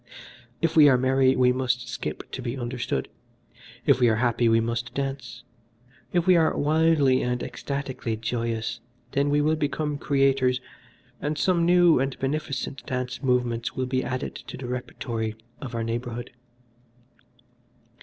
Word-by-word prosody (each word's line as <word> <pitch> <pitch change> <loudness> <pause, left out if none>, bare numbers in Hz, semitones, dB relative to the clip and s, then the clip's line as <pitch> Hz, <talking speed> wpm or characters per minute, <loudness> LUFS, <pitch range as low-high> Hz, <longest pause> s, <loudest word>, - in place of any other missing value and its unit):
If 165 - +1
we 150 -2 +8
are 130 - +5
merry 130 +1 +3
we 125 0 +4
must 125 -1 -1
skip 120 +1 -5
to 130 - -5
be 120 +1 -4
understood. 120 - -3 0.8
If - - +4
we 120 -2 +5
are 110 - +3
happy 120 0 +2
we 115 0 +4
must 115 +1 -3
dance. 135 -3 -4 0.7
If 175 -1 +1
we 185 -1 +6
are 160 -2 +3
wildly 150 -3 +3
and 125 0 -1
ecstatically 135 -5 -4
joyous 115 0 -2 0.3
then 140 +1 +1
we 145 +1 +3
will 155 +2 +2
become 150 -1 -2
creators, 135 -3 +2 0.6
and 150 +1 -2
some 170 -2 +2
new 175 -4 +5
and 135 0 -1
beneficent 135 -2 -3
dance 125 0 -3
movements 125 -3 0
will 130 - -1
be 130 0 -1
added 130 0 -3
to - - -9
the 130 - -7
repertory 115 -3 -4 0.3
of 130 -4 -6
our 115 - -1
neighborhood. 120 +1 -4
130 Hz, 150 wpm, -25 LUFS, 120-140 Hz, 0.8 s, we